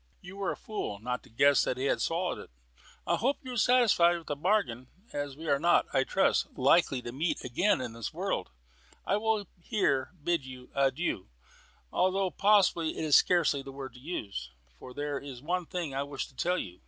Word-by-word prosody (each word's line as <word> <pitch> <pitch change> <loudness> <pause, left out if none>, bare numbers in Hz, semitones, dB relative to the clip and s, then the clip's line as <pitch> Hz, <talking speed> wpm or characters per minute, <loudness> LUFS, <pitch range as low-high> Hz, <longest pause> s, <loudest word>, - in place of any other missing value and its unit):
"You 180 +2 -11
were 200 -1 -1
a - - -6
fool 210 - -4
not 125 +4 -3
to - - -19
guess 140 +5 +4
that 125 - -1
he 130 - -2
had - - +1
swallowed 175 +2 -1
it. - - -11 0.6
I - - +1
hope 270 +6 +1
you 260 - -6
are - - -5
satisfied 220 -8 +4
with 165 - -11
the 145 - -3
bargain. 150 - 0 0.3
As 145 -1 -4
we 160 +1 -8
are 140 -2 +3
not, 175 +3 +4
I 135 -1 +3
trust, 190 - +1
likely 135 -1 +3
to 120 - -5
meet 155 +7 -2
again 180 +12 +2
in 125 -3 -5
this 115 -2 -5
world, - - -2 0.6
I 200 - +2
will 215 -1 0 0.2
here 170 - +1
bid 170 -3 +1
you 130 -1 -11
Adieu, 135 - 0 0.6
though 185 0 +1
possibly 190 -6 +3
that - - -7
is 155 -3 +3
scarcely 170 -5 +4
the 135 0 -9
word 135 -2 -8
to 125 - -13
use. 100 - -5 0.3
But 125 - -11
there 145 -1 -2
is 135 -3 -9
one 175 +1 -1
thing 170 -6 -4
I 135 - -1
wish 140 -1 -4
to 130 - -23
tell 180 +6 0
you. 90 - -6
145 Hz, 205 wpm, -30 LUFS, 130-180 Hz, 0.6 s, guess